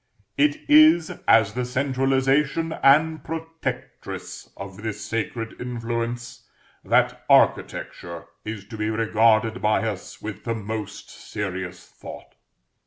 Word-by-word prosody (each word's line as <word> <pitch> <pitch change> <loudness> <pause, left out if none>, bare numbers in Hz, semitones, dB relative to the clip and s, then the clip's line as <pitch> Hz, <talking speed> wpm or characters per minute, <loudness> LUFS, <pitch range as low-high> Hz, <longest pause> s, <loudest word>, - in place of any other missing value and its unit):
It 300 +1 +1
is 300 - +6 0.2
as 110 -2 +5
the 125 +2 -2
centralisation 135 +4 +1
and 155 +2 +4
protectress 165 0 -6
of 100 -1 -8
this 110 -2 -5
sacred 115 +1 -4
influence, 120 0 -4 0.3
that - - +2
Architecture 85 -1 +1 0.2
is 105 -2 -6
to 110 - -7
be 105 0 -1
regarded 110 +1 +2
by 110 +1 +2
us 100 -4 -6
with 110 -2 -7
the 115 -1 -2
most 110 -1 -6
serious 95 -3 -6
thought. - - -11
115 Hz, 110 wpm, -24 LUFS, 110-135 Hz, 0.3 s, is